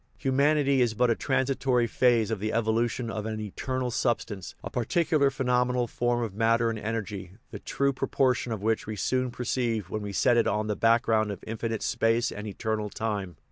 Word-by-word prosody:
Humanity 140 Hz, 0 st, +2 dB
is 115 Hz, -3 st, +1 dB
but 125 Hz, +1 st, +3 dB
a -, -, +2 dB
transitory 130 Hz, -2 st, +1 dB
phase 115 Hz, -2 st, +2 dB
of 110 Hz, -, -1 dB
the 110 Hz, +2 st, -2 dB
evolution 115 Hz, +1 st, 0 dB
of 110 Hz, -1 st, -4 dB
an 110 Hz, -1 st, -3 dB
eternal 125 Hz, +4 st, -3 dB
substance, 115 Hz, -5 st, -2 dB
a -, -, -5 dB
particular 145 Hz, +3 st, +2 dB
phenomenal 125 Hz, -2 st, +1 dB
form 120 Hz, +1 st, -1 dB
of 110 Hz, -4 st, -4 dB
matter 115 Hz, +2 st, +2 dB
and 110 Hz, -, -5 dB
energy, 105 Hz, -4 st, -4 dB, 0.2 s
the -, -, -7 dB
true 140 Hz, 0 st, 0 dB
pro 135 Hz, +1 st, -3 dB
portion 125 Hz, -2 st, +1 dB
of 105 Hz, -3 st, -4 dB
which 110 Hz, 0 st, 0 dB
we 110 Hz, -, -4 dB
soon 130 Hz, +5 st, 0 dB
perceive 120 Hz, -5 st, -2 dB
when 110 Hz, -, -2 dB
we 100 Hz, -1 st, -5 dB
set 120 Hz, +4 st, +3 dB
it 115 Hz, -, +3 dB
on 105 Hz, 0 st, 0 dB
the 105 Hz, -1 st, -1 dB
background 115 Hz, -1 st, +3 dB
of 100 Hz, -, -6 dB
infinite 115 Hz, 0 st, -3 dB
space 115 Hz, +1 st, +1 dB
and 105 Hz, +1 st, -6 dB
eternal 105 Hz, +1 st, -2 dB
time. 100 Hz, -5 st, -3 dB
115 Hz, 190 wpm, -27 LUFS, 110-125 Hz, 0.2 s, but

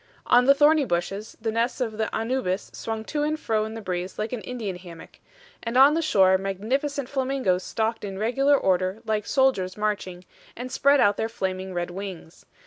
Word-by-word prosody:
On 245 Hz, 0 st, +5 dB
the 275 Hz, +1 st, +6 dB
thorny 300 Hz, +1 st, +5 dB
bushes 195 Hz, 0 st, -3 dB
the 225 Hz, 0 st, -2 dB
nests 230 Hz, +4 st, -1 dB
of 225 Hz, -4 st, -3 dB
the 220 Hz, -, 0 dB
ANNUBIS 225 Hz, -5 st, -2 dB
swung 220 Hz, -1 st, -5 dB
to 295 Hz, +4 st, -2 dB
and 305 Hz, +1 st, -1 dB
fro 220 Hz, -6 st, 0 dB
in 220 Hz, +1 st, -7 dB
the 225 Hz, -, -6 dB
breeze 180 Hz, 0 st, -4 dB
like 215 Hz, +3 st, -3 dB
an 240 Hz, -, -3 dB
Indian 225 Hz, -7 st, -5 dB
hammock; 175 Hz, -2 st, -13 dB, 0.4 s
and 230 Hz, +1 st, -2 dB
on 275 Hz, +3 st, +8 dB
the 330 Hz, -, +1 dB
shore 190 Hz, -11 st, +4 dB
magnificent 245 Hz, +9 st, -2 dB
flamingos 260 Hz, -9 st, 0 dB
stalked 225 Hz, +1 st, -2 dB
in 195 Hz, -2 st, -5 dB
regular 270 Hz, +7 st, +3 dB
order 185 Hz, 0 st, 0 dB
like 215 Hz, -1 st, -1 dB
soldiers 235 Hz, -9 st, +1 dB
marching, 195 Hz, -4 st, -3 dB, 0.3 s
and 250 Hz, +2 st, -6 dB
spread 280 Hz, +2 st, +4 dB
out 205 Hz, -4 st, +4 dB
their 225 Hz, -, -1 dB
flaming 190 Hz, -4 st, -4 dB
red 175 Hz, 0 st, -2 dB
wings. 185 Hz, -3 st, -8 dB
220 Hz, 190 wpm, -25 LUFS, 190-260 Hz, 0.4 s, on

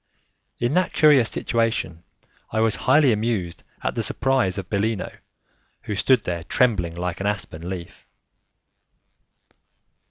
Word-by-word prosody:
In 120 Hz, +3 st, -1 dB
that 180 Hz, 0 st, +1 dB
curious 145 Hz, -7 st, +5 dB
situation, 115 Hz, -8 st, -1 dB, 0.5 s
I 110 Hz, -, -2 dB
was 110 Hz, -1 st, +2 dB
highly 145 Hz, -4 st, +6 dB
amused 105 Hz, -6 st, -2 dB, 0.2 s
at -, -, -1 dB
the -, -, -2 dB
surprise 130 Hz, -9 st, +1 dB
of 95 Hz, -2 st, -5 dB
Bellino, 105 Hz, 0 st, -2 dB, 0.7 s
who 105 Hz, -, -4 dB
stood 115 Hz, +4 st, +3 dB
there 85 Hz, -2 st, -3 dB
trembling 90 Hz, -6 st, +1 dB
like 90 Hz, 0 st, -4 dB
an 100 Hz, -, -1 dB
aspen 90 Hz, -4 st, -4 dB
leaf. 90 Hz, -3 st, -8 dB
105 Hz, 125 wpm, -23 LUFS, 90-120 Hz, 0.7 s, highly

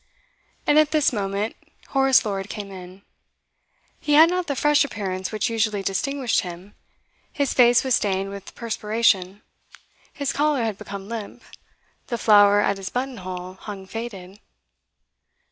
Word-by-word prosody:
And 295 Hz, +1 st, +5 dB
at 310 Hz, -1 st, +4 dB
this 305 Hz, -4 st, +2 dB
moment 200 Hz, 0 st, -2 dB, 0.3 s
Horace 270 Hz, -2 st, +4 dB
Lord 195 Hz, -1 st, -3 dB
came 200 Hz, -2 st, -6 dB
in. 185 Hz, +1 st, -11 dB, 1.0 s
He 295 Hz, -, -1 dB
had 320 Hz, +3 st, +7 dB
not 360 Hz, -1 st, -1 dB
the 285 Hz, -, -1 dB
fresh 295 Hz, +1 st, +3 dB
appearance 190 Hz, -8 st, -4 dB
which 215 Hz, +1 st, -1 dB
usually 215 Hz, -3 st, 0 dB
distinguished 255 Hz, +6 st, 0 dB
him; 180 Hz, +2 st, -7 dB, 0.6 s
his 285 Hz, -2 st, -1 dB
face 240 Hz, -1 st, +5 dB
was 260 Hz, -1 st, 0 dB
stained 195 Hz, -3 st, 0 dB
with 200 Hz, -1 st, -10 dB
perspiration, 210 Hz, -4 st, 0 dB, 0.7 s
his 280 Hz, -2 st, -3 dB
collar 295 Hz, -4 st, +1 dB
had 220 Hz, -3 st, -3 dB
become 200 Hz, -1 st, -8 dB
limp, 225 Hz, -2 st, -7 dB, 0.6 s
the 240 Hz, -, -2 dB
flower 205 Hz, -2 st, +5 dB
at 200 Hz, -1 st, +1 dB
his 195 Hz, 0 st, -6 dB
buttonhole 185 Hz, -8 st, -5 dB
hung 195 Hz, 0 st, -9 dB
faded. 200 Hz, -2 st, -8 dB
210 Hz, 140 wpm, -23 LUFS, 195-260 Hz, 1.0 s, had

